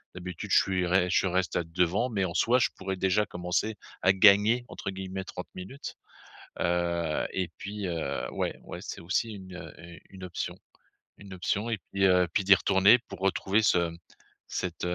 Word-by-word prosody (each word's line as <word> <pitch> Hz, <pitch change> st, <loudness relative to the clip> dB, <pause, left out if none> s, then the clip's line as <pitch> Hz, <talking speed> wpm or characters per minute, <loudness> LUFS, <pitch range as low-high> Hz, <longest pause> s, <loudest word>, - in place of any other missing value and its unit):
D'habitude 90 Hz, -1 st, -7 dB
je -, -, +6 dB
suis 95 Hz, -2 st, 0 dB
rai 90 Hz, 0 st, +3 dB
je 95 Hz, -, +2 dB
reste 90 Hz, 0 st, 0 dB
a 85 Hz, -, 0 dB
devant, 90 Hz, +8 st, +1 dB
mais 100 Hz, -5 st, -1 dB
en 85 Hz, -, -4 dB
soi 120 Hz, +8 st, +3 dB
je 125 Hz, -, +3 dB
pourrais 95 Hz, 0 st, -3 dB
déjà 95 Hz, +3 st, +2 dB
commencer 90 Hz, +4 st, -2 dB, 0.3 s
à 95 Hz, -, +5 dB
«gagner», 105 Hz, +5 st, +6 dB
entre -, -, -5 dB
guillemets, 95 Hz, 0 st, -5 dB
30 -, -, -8 dB
minutes. 95 Hz, +10 st, -8 dB, 0.7 s
Heu, 85 Hz, -2 st, 0 dB
et 95 Hz, -2 st, -1 dB
puis, 100 Hz, -1 st, -5 dB
heu, 85 Hz, -2 st, -3 dB
ouais, -, -, -2 dB
ouais, -, -, -7 dB
c'est -, -, -7 dB
aussi 100 Hz, +6 st, -1 dB
une, 95 Hz, -2 st, -10 dB
heu, 80 Hz, -3 st, -9 dB
heu, 85 Hz, +1 st, -11 dB
une 95 Hz, -1 st, -12 dB
option 90 Hz, -, -4 dB, 0.6 s
une 100 Hz, -1 st, -12 dB
option 100 Hz, +5 st, -1 dB
et 110 Hz, -, -1 dB
puis, 95 Hz, 0 st, +3 dB
heu, 90 Hz, -1 st, +4 dB
puis 100 Hz, -, +1 dB
d'y 95 Hz, +1 st, +8 dB
retourner 95 Hz, +5 st, +5 dB
pour 115 Hz, -, -12 dB
retrouver 95 Hz, +2 st, +1 dB
ce, 100 Hz, -, +4 dB
mmh, 85 Hz, -, -11 dB, 0.5 s
cette, 90 Hz, -2 st, -3 dB
heu, 90 Hz, -, -1 dB
95 Hz, 195 wpm, -28 LUFS, 90-100 Hz, 0.7 s, d'y